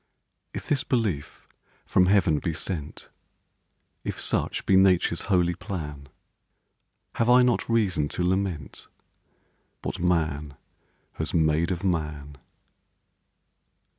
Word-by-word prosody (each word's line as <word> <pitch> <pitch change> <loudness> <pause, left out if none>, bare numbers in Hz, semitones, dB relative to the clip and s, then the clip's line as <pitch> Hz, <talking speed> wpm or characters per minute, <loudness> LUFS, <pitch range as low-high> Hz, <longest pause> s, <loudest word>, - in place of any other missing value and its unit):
If - - -7
this 140 -3 +1
belief 100 - -2 0.4
from 90 -1 +3
heaven 90 -6 +3
be 85 0 -2
sent, 80 -3 -5 0.9
If - - -4
such - - -1
be 95 - +4
Nature's 90 -3 +4
holy 90 -3 +3
plan, 75 -7 -6 1.1
Have 115 - +2
I 125 +1 +7
not 125 -2 +1
reason 100 -10 +1
to 90 - 0
lament 95 -6 -2 1.0
What - - -4
Man 80 -5 0 0.6
has 80 +2 -3
made 80 0 +2
of 90 0 -3
Man? 75 -6 -2
85 Hz, 105 wpm, -26 LUFS, 75-95 Hz, 1.1 s, I